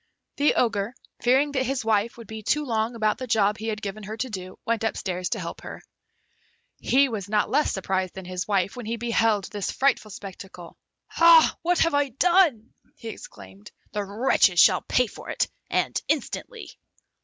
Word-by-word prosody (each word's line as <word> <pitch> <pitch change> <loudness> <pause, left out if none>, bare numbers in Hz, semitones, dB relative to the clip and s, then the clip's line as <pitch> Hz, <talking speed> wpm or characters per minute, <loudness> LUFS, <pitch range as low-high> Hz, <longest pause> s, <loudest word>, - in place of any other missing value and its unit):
The 290 +1 +3
Ogre, 225 0 0 0.3
fearing 265 +4 +3
that 265 -2 0
his 265 -3 -2
wife 220 +1 +1
would 230 - -10
be 220 +1 -8
too 300 +8 0
long 225 -1 -1
about 215 -2 0
the 255 - -5
job 215 -2 +2
he 220 - -5
had 215 -1 -3
given 205 +1 -5
her 215 +2 -7
to 255 +2 -3
do, 185 -2 -7
went 230 -1 -1
upstairs 185 -4 -2
to - - -2
help - - -6
her. - - -9 1.0
He 275 +2 +3
was 205 -6 -5
not 210 0 +1
less 300 - +2
surprised 190 -1 -2
than 190 -1 -8
his 180 +1 -4
wife, 195 -2 0
when 245 -3 -7
he 230 +1 -2
beheld 225 -3 +1
this 205 -3 -3
frightful 270 -5 +1
spectacle. 190 -3 -10 0.3
"Hah! 335 -1 +6
what 350 +1 +1
have 330 -1 +2
I 285 -1 +2
done?" 290 - +2 0.2
he 230 - -8
exclaimed. 100 - -12 0.2
"The 210 - -2
wretches 200 -3 +2
shall 185 -2 +6
pay 250 - +1
for - - -11
it, - - 0 0.2
and - - 0
instantly!" 475 -3 -3
220 Hz, 185 wpm, -25 LUFS, 200-255 Hz, 1.0 s, Hah